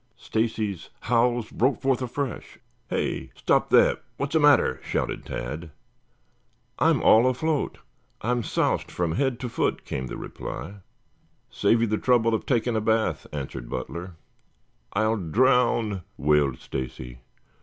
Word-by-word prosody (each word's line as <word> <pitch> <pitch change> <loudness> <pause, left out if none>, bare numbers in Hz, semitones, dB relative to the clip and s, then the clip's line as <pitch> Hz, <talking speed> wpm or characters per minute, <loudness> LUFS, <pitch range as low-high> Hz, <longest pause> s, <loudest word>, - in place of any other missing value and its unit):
Stacy's 110 -5 -2
howls 120 -1 +1
broke 130 +3 +1
forth 130 -1 +1
afresh. 125 0 -4 0.3
"Hey! - - -2
Stop - - +1
that. - - +5 0.2
What's 140 +1 -3
the 160 - +4
matter?" 145 - +4
shouted - - -2
Tad. 75 +7 -5 1.1
"I'm - - +3
all 115 +3 +6
afloat. 145 +4 0 0.4
I'm 120 +2 0
soused - - 0
from 85 -2 -1
head 130 - 0
to 125 - -2
foot," 115 - -1
came 65 0 -4
the - - -6
reply. 100 +5 -7 0.7
"Save 115 - +2
you - - +4
the 110 -1 -1
trouble 115 -3 +3
of 110 - -2
taking 120 -2 +1
a 110 - +1
bath," 110 +1 0
answered 70 -4 -6
Butler. 90 +1 -5 0.8
"I'll 110 +2 +2
drown," 115 - +2 0.2
wailed 75 -3 +2
Stacy. 65 -1 -6
110 Hz, 135 wpm, -25 LUFS, 85-125 Hz, 1.1 s, all